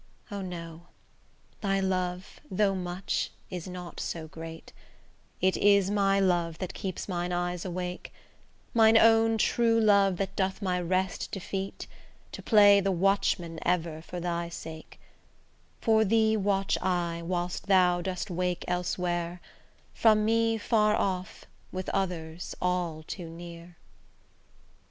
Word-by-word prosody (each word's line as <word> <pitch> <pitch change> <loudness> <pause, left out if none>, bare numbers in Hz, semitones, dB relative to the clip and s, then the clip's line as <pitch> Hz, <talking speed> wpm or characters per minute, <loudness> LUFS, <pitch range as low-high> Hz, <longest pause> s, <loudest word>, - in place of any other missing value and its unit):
O, 200 -1 -4
no! 170 -2 -7 0.7
thy 195 -1 +1
love, 185 -1 -2
though 195 +1 +2
much, 180 0 -2 0.2
is 180 -1 -5
not 180 -1 -8
so 160 -2 -4
great: 165 +1 -10 0.7
It 185 +1 +3
is 200 -1 +4
my 195 -1 +3
love 175 -4 +1
that 185 0 -5
keeps 190 -3 -5
mine 175 -2 -2
eye 175 0 -1
awake: 180 -1 -5 0.6
Mine 225 -1 +6
own 225 0 +5
true 230 +1 +3
love 200 -4 +4
that 195 0 -3
doth 190 -1 -1
my 180 -3 -1
rest 185 +1 -1
defeat, 195 0 -5 0.5
To - - -7
play 205 -2 +6
the 195 0 +1
watchman 175 -3 +1
ever 165 -3 -1
for 175 +2 -7
thy 170 -1 -2
sake: 160 -1 -9 0.8
For 220 -1 +4
thee 220 +1 +3
watch 195 -1 +1
I, 175 -2 -1
whilst 175 +2 -3
thou 180 -2 +4
dost 180 0 -4
wake 180 0 -2
elsewhere, 175 -1 -2 0.5
From 215 -2 +4
me 225 0 +2
far 215 -1 +2
off, 185 -3 -2 0.3
with 185 0 -4
others 175 -3 -3
all 175 -3 -1
too 170 +1 -7
near. 170 0 -10
185 Hz, 130 wpm, -28 LUFS, 175-200 Hz, 0.8 s, Mine